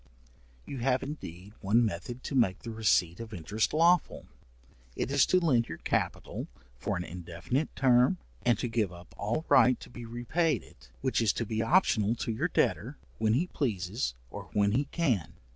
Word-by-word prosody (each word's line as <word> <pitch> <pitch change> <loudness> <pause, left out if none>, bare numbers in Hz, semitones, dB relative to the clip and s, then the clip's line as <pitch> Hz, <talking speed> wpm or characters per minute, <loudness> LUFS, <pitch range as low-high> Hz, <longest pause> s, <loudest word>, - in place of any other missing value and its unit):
You 135 - -6
have 130 +1 +1
indeed 100 - -8
one 115 +5 +3
method 115 +6 -5
to - - -5
make 115 -7 +2
the 115 - -5
receipt 95 -6 +2
of 115 -2 -7
interest 105 +6 -1
lawful, 170 +2 +3 0.7
it - - -2
is 140 -2 +4
to 185 - +4
lend 130 -9 +2
your 80 - -5
capital - - -2 0.3
for - - -2
an - - -3
indefinite 90 - -4
term, 125 -5 +4 0.2
and 120 -3 +2
to 120 - -2
give 110 -5 0
up 85 0 -13
all 120 +10 -2
right 125 -1 +5
to - - -12
be 120 -1 -8
repaid 145 +8 0
it, - - -19
which 130 -2 +1
is 110 -3 +3
to 115 - -2
be 110 +1 -2
optional 115 - +3
to 120 - -3
your 110 - 0
debtor, - - 0 0.2
when 110 0 +2
he 145 +9 +2
pleases, 105 - -2 0.2
or - - -8
when 100 -1 +3
he 135 +7 +1
can. 135 - -1
115 Hz, 180 wpm, -30 LUFS, 100-130 Hz, 0.7 s, right